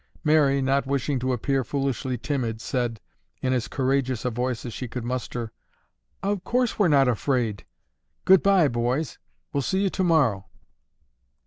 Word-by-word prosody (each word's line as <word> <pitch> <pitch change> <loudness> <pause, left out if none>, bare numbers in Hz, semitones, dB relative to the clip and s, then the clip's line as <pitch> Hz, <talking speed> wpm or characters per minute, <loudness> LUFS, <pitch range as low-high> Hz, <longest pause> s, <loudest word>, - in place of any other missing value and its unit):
Mary, 145 -3 +3
not 135 +1 +1
wishing 140 0 0
to 130 +1 -1
appear 135 +2 0
foolishly 135 -1 -2
timid, 120 -4 -2
said, 120 -2 -2 0.4
in 130 0 0
as 120 -4 -1
courageous 130 -3 0
a 125 - +1
voice 125 +1 -2
as 120 - -5
she 125 - -5
could 120 0 -5
muster, 120 -2 -4 0.7
"Of 200 -1 -1
course 250 -2 0
we're 205 - +5
not 140 -4 +4
afraid. 120 -3 0 0.6
Goodbye, 190 -3 +5
boys, 120 +6 -1 0.3
we'll 140 - +1
see 190 +8 0
you 195 - +1
tomorrow." 145 - +2
130 Hz, 145 wpm, -25 LUFS, 120-145 Hz, 0.7 s, we're